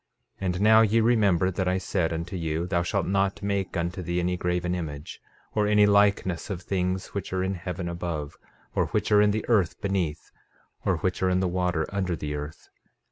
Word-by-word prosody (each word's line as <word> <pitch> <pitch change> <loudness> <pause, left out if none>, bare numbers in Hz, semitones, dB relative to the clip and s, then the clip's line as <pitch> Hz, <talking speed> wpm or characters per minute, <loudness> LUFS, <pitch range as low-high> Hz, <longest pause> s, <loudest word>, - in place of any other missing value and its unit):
13:12 - - -2
And 90 +1 -1
now, 110 +1 +7
ye 115 +1 +3
remember 105 -6 +3
that 95 0 -2
I 90 +1 +2
said 95 -2 -1
unto 85 +3 -4
you: 80 -1 -2
Thou 90 -1 0
shall 95 +3 0
not 95 +1 0
make 100 -3 -1
unto 85 +2 -2
thee 85 0 -1
any 90 +1 0
graven 90 0 -1
image, 75 -4 -6 0.3
or 105 -1 +2
any 105 0 +5
likeness 100 -3 +2
of 90 -3 -4
things 95 0 -2
which 100 - -4
are 95 0 0
in 95 +1 -1
heaven 90 -1 -5
above, 85 -4 -4 0.4
or - - +1
which - - -1
are 105 0 +6
in 105 - +4
the 105 +1 -1
earth 100 -8 +2
beneath, 95 -6 -2 0.5
or 95 -3 +1
which 90 +3 -2
are 95 - +3
in 90 0 +2
the 95 - +1
water 90 -2 0
under 95 -3 -1
the 75 -2 -4
earth. 75 +1 -7
90 Hz, 205 wpm, -26 LUFS, 85-100 Hz, 0.5 s, now